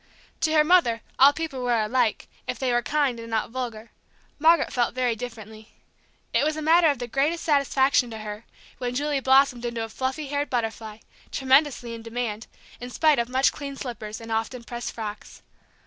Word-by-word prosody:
To 315 - +1
her 305 -1 +5
mother 300 -9 +3 0.2
all 275 +2 +8
people 300 -4 -5
were 240 -2 +2
alike, 225 +1 0 0.2
if 250 - -3
they 255 0 0
were 240 - +2
kind 280 -3 0
and 230 0 -8
not 225 0 -1
vulgar; 235 -3 -5 0.5
Margaret 320 0 +4
felt 245 -1 0
very 250 -2 +1
differently. 220 -2 -9 0.6
It - - +3
was 310 +1 0
a - - -3
matter 330 +2 +5
of 285 - 0
the 245 - -4
greatest 285 +7 0
satisfaction 280 -4 +2
to 225 - -7
her 215 +1 -7 0.3
when 245 -1 -3
Julie 290 +1 0
blossomed 265 -2 +3
into 235 -1 -3
a 225 - -6
fluffy 260 +6 -3
haired 290 +1 -1
butterfly, 225 -3 -3 0.3
tremendously 265 -3 +2
in 230 - -7
demand, 230 -1 -4 0.3
in 245 - -7
spite 305 +1 +3
of 235 0 -1
much 260 +1 +3
cleaned 280 -1 -7
slippers 220 -4 -6
and 225 0 -9
often 225 +2 -2
pressed 240 +1 -5
frocks. 215 -2 -8
245 Hz, 185 wpm, -25 LUFS, 230-280 Hz, 0.6 s, all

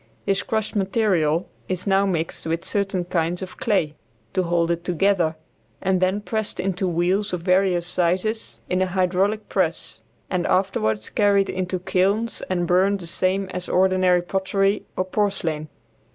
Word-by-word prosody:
This 195 -1 +1
crushed 220 -1 -2
material 190 -5 +1 0.2
is 185 -1 -1
now 195 0 +3
mixed 165 -3 -2
with 165 +1 -2
certain 195 -3 0
kinds 175 +1 -1
of 185 - -9
clay, 190 -9 +1 0.4
to 185 - +2
hold 170 -1 +1
it 170 0 -2
together, 175 -2 +1 0.4
and 190 -1 +1
then 190 +3 +1
pressed 220 0 -3
into 190 0 -1
wheels 180 +4 0
of 180 - -2
various 180 -1 +2
sizes 180 +5 -1
in 185 +1 0
a 185 - +2
hydraulic 190 +3 0
press, 165 - -2 0.3
and 180 -2 -1
afterward 110 - +1
carried 200 -2 +3
into 185 0 -2
kilns 195 +5 0
and 175 -2 0
burned 190 +3 +3
the 175 - -8
same 185 +3 0
as 180 -1 -5
ordinary 185 -1 +3
pottery 195 +2 0
or 185 - +1
porcelain. 185 -6 -1
185 Hz, 150 wpm, -23 LUFS, 175-195 Hz, 0.4 s, now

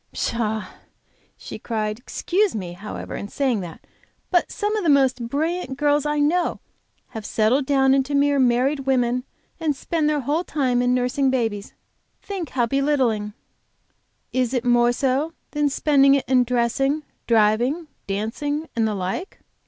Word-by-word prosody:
"Pshaw!" 220 -2 -1 1.0
cried 215 -2 -2
she. - - -23
"Excuse 380 - 0
me, 180 -4 -4
however, 200 +3 -7
saying 255 -1 0
that; 175 -4 -9 0.5
but 355 -2 +2
some 420 -1 -1
of 425 - -1
the 335 - +2
most 260 -4 +3
brilliant 310 -1 -2
girls 295 0 +2
I 295 0 0
know 330 +4 +1 0.5
have 220 - -7
settled 230 +6 +1
down 270 -1 +4
into 275 +1 +1
mere 285 0 +3
married 260 +3 +2
women 250 -1 +1 0.3
and 310 -3 0
spend 310 +2 -1
their 300 -1 0
whole 295 +7 0
time 255 -7 0
in 250 0 +2
nursing 255 +2 +1
babies! 225 -6 -2 0.4
Think 380 -6 -5
how 245 -2 +1
belittling!" 250 -6 0 1.0
"Is 255 0 0
it 245 0 -1
more 240 0 +4
so 275 +5 0 0.2
than 295 -1 +1
spending 275 -1 +4
it 275 - -1
in 255 -1 +4
dressing, 250 +5 0 0.2
driving, 235 +8 +2 0.2
dancing, 290 +10 -2
and 225 -1 +2
the 210 - -2
like?" 190 - -4
265 Hz, 150 wpm, -23 LUFS, 235-295 Hz, 1.0 s, down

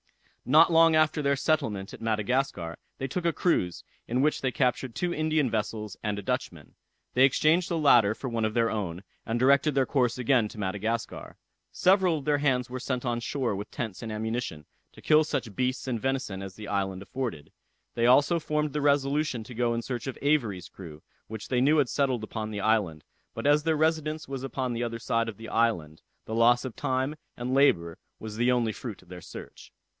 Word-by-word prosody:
Not 155 +6 +6
long 165 0 +6
after 155 0 +3
their 140 -1 +2
settlement 135 -10 -1
at - - -10
Madagascar, 110 -5 -1 0.2
they 135 - -3
took 175 +7 -3
a 170 - +3
cruise, 90 - 0 0.2
in 125 +3 +1
which 150 - +1
they 130 - 0
captured 125 -1 0
two 175 -1 -1
Indian 155 -5 +1
vessels 105 -1 -3
and 105 -2 -2
a 100 - -5
Dutchman. - - -4 0.4
They 130 - +4
exchanged 155 +6 +3
the 170 - 0
latter 120 -9 +5
for 135 - -6
one 115 -2 -2
of 110 0 -1
their 115 -1 +2
own, 95 -4 -4 0.2
and 115 +1 0
directed 140 +3 +4
their 135 -1 +3
course 125 -4 +1
again 125 -2 +2
to - - -12
Madagascar. 110 +4 -3 0.3
Several 185 -3 +3
of 145 - -8
their 145 -1 +2
hands 130 -4 +1
were 130 - -4
sent 130 0 -3
on 120 -1 0
shore 120 -2 -2
with 100 +2 -6
tents 110 -6 -5
and 115 -2 -5
ammunition, 110 -8 -3 0.3
to - - -15
kill 155 0 +5
such 115 -8 -3
beasts 130 +3 -1
and 120 -4 -2
venison 135 -8 -2
as 95 -1 -8
the 105 -1 -9
island 95 -1 -2
afforded. 105 - -5 0.4
They 115 0 +2
also 145 +7 +5
formed 150 -2 -1
the 150 - -1
resolution 140 -2 +1
to 125 - -10
go 120 0 0
in 115 - -3
search 125 0 -4
of 135 - -5
Avery's 115 - +1
crew, 80 -5 -11 0.2
which 110 -1 -8
they 125 -1 +1
knew 150 +4 +4
had 140 -5 +2
settled 130 -5 0
upon 110 0 -4
the 105 -1 -4
island; 100 -8 +1 0.3
but - - -5
as 145 +1 +5
their 160 -1 +1
residence 155 -1 0
was 135 -1 -5
upon 130 -2 -3
the 115 - -3
other 115 -1 -4
side 115 -1 0
of 105 - -9
the 115 - -9
island, 90 -10 0 0.2
the 110 - -6
loss 120 +2 +4
of 130 - -6
time 130 +1 -1 0.2
and 125 +1 -3
labour 85 -12 +3 0.2
was 110 -1 -7
the 120 +2 +3
only 120 -3 +1
fruit 110 -5 -8
of - - -24
their 90 -1 -9
search. - - -11
125 Hz, 210 wpm, -27 LUFS, 110-140 Hz, 0.4 s, Not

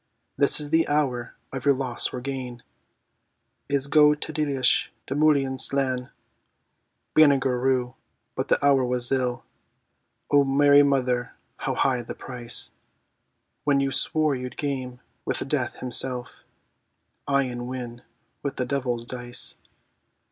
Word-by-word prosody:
This 140 +2 +6
is 150 -1 -2
the 165 0 +3
hour 135 -5 -1 0.2
of 130 -2 -5
your 140 0 +4
loss 130 -3 -1
or 125 - -6
gain: 125 -3 -6 1.1
Is 140 -1 +1
go 150 +1 +5
d 155 +1 -7
tigheadh 145 -4 +1 0.2
do, - - -4
mhûirnín 140 -3 +2
slan! 130 -2 0 1.1
Banagher 135 -5 +4
Rhue, 125 -1 0 0.4
but - - -3
the - - +3
hour 140 -2 +4
was 125 -1 0
ill 125 -2 -1 0.9
(O 145 -1 +5
Mary 140 +1 +5
Mother, 130 -3 0 0.2
how - - -3
high 130 -3 +1
the 115 - -8
price!) 120 -2 -3 0.9
When 145 -2 +2
you 135 0 0
swore 155 +1 +3
you'd 125 -1 -7
game 130 -3 -4 0.2
with - - -1
Death - - -2
himself; 125 0 0 0.8
Aye, 140 0 +2
and 120 -1 -5
win 125 -2 -7 0.4
with 140 - -4
the 125 - -2
devil's 125 -4 -2
dice. 120 0 -2
130 Hz, 135 wpm, -25 LUFS, 125-140 Hz, 1.1 s, This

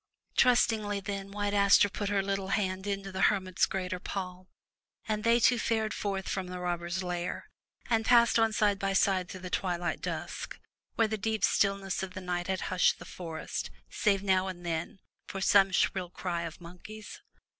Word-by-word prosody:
Trustingly, 220 -4 +3
then, 195 0 -5
White 205 0 -2
Aster 200 0 +6
put 200 0 -3
her 200 -1 +1
little 195 -1 -2
hand 190 -1 -1
within 195 -1 -3
the 190 - -2
hermit's 185 -3 +2
greater 185 -1 -3
palm, 180 -1 -5 0.6
and 215 -1 -1
they 230 +1 +4
two 240 +1 +4
fared 220 -1 0
forth 195 -2 -3
from 190 -2 -2
the 180 0 -6
robbers' 175 +1 -2
lair, 175 -1 -3 0.4
and 225 -2 +2
passed 235 0 +5
on 225 0 +3
side 210 -2 +2
by 195 0 0
side 190 -1 +2
through 185 -1 -7
twilight 175 -2 -1
dusk, - - -5 0.4
where 225 - +3
the 215 0 -3
deep 220 0 -1
stillness 195 -2 +1
of 190 -1 -6
the - - -4
night 175 -1 -2
had 190 -1 -1
hushed 185 -1 +2
the - - -11
forest, 165 -3 -5 0.2
save 200 -2 +1
now 190 -1 +2
and 175 -2 -7
then, 165 +2 -3 0.3
for 195 - -5
some 195 0 +5
shrill 185 0 +1
cry 175 -1 -3
of 165 0 -8
monkeys. 180 +5 -10
195 Hz, 175 wpm, -30 LUFS, 180-205 Hz, 0.6 s, Aster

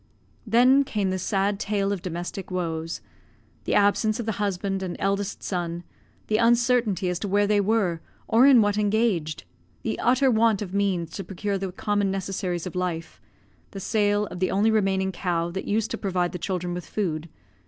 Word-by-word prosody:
Then 250 +5 +5
came 210 -8 -1
the 185 - -2
sad 195 +2 0
tale 200 -1 0
of 200 -3 -2
domestic 175 +2 -5
woes: 165 -3 -3 0.6
the - - 0
absence 210 +2 +3
of 235 - -3
the 220 - 0
husband 195 -1 -1
and 185 -2 -4
eldest 200 0 -2
son; 175 -2 -3 0.4
the 215 - +1
uncertainty 235 -4 +2
as 180 -1 -1
to 205 - -3
where 205 +1 +3
they 205 0 +3
were, 195 -5 +1 0.3
or 240 +4 +5
in 255 -5 +7
what 205 0 +1
engaged; 205 - 0 0.4
the 110 - -2
utter 260 +2 +3
want 225 -2 +3
of 190 -2 -8
means 190 -5 0
to 195 - -5
procure 195 +2 -3
the 190 -1 -3
common 205 +1 0
necessaries 190 -2 -3
of 180 - -5
life; 175 -3 -3 0.5
the 195 - -8
sale 205 0 +1
of 180 - -6
the 185 - +1
only 210 +3 +2
remaining 190 -3 +1
cow 170 -2 -1
that 190 +2 -4
used 220 +1 0
to - - -3
provide 180 -3 0
the 180 - -6
children 180 0 -2
with 175 -1 -6
food. 165 -6 -2
195 Hz, 185 wpm, -25 LUFS, 180-210 Hz, 0.6 s, in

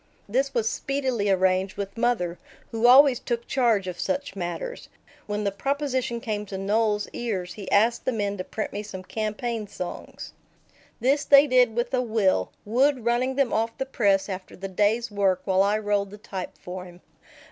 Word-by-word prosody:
This 265 +6 0
was 225 -2 +1
speedily 260 -6 -1
arranged 190 0 +2
with 200 -1 -5
mother, 205 -8 0 0.3
who 230 +1 +2
always 260 0 +7
took 235 -1 -3
charge 230 -7 +2
of 180 - -5
such 285 -6 -2
matters. 195 - -5 0.4
When 210 0 -2
the 200 - 0
proposition 260 +1 -1
came 210 -2 -3
to 195 - -5
Noel's 210 +1 +1
ears, 190 -7 -3
he 200 -3 -8
asked 230 +4 +3
the - - +2
men 205 -3 -1
to 185 - -3
print 215 - -5
me 205 - -3
some 195 -3 -8
campaign 215 +2 -3
songs. 180 -3 -7 0.7
This 275 +5 +2
they 280 -1 +7
did 250 -4 +3
with 240 +2 -1
a 255 - +2
will, 215 - +1
Wood 255 +3 +2
running 250 +2 +1
them 275 -3 +1
off 225 +1 0
the 265 - -2
press 200 -7 +2
after 185 -2 -7
the 195 +2 -6
day's 210 +5 +1
work 195 -2 +1
while 190 -1 +3
I 205 +2 +3
rolled 205 -2 0
the 205 - -10
type 190 -3 -7
for 180 0 -7
him. 175 0 -14
215 Hz, 180 wpm, -25 LUFS, 195-245 Hz, 0.7 s, always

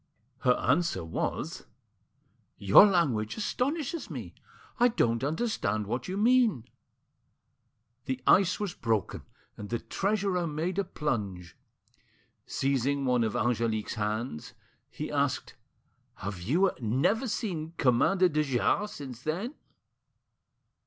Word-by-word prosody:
Her 125 - +4
answer 165 - +1
was— 80 - -3 0.9
"Your 100 - +8
language 135 - +1
astonishes 285 +8 -2
me; - - -7 0.5
I 245 - +6
don't 120 - +1
understand 140 - -1
what 120 +4 -3
you 185 +1 -3
mean." 225 - +3 1.4
The 130 -3 -2
ice 190 -1 +4
was 205 -4 -2
broken, 110 - -1 0.4
and 105 -1 -7
the 120 - 0
treasurer 195 - -1
made 165 +5 -2
a - - +2
plunge. 100 - -4 0.9
Seizing 140 +1 0
one 125 -2 +2
of 110 - -1
Angelique's 115 -2 0
hands, 110 - -3 0.3
he - - -6
asked— - - -1 0.6
"Have 95 -2 -6
you 170 - +2
never 140 - +1
seen 170 -7 -3
Commander 165 +9 +3
de 155 -3 0
Jars 150 - +1
since 130 -4 -8
then?" 180 - -3
140 Hz, 110 wpm, -29 LUFS, -, 1.4 s, Your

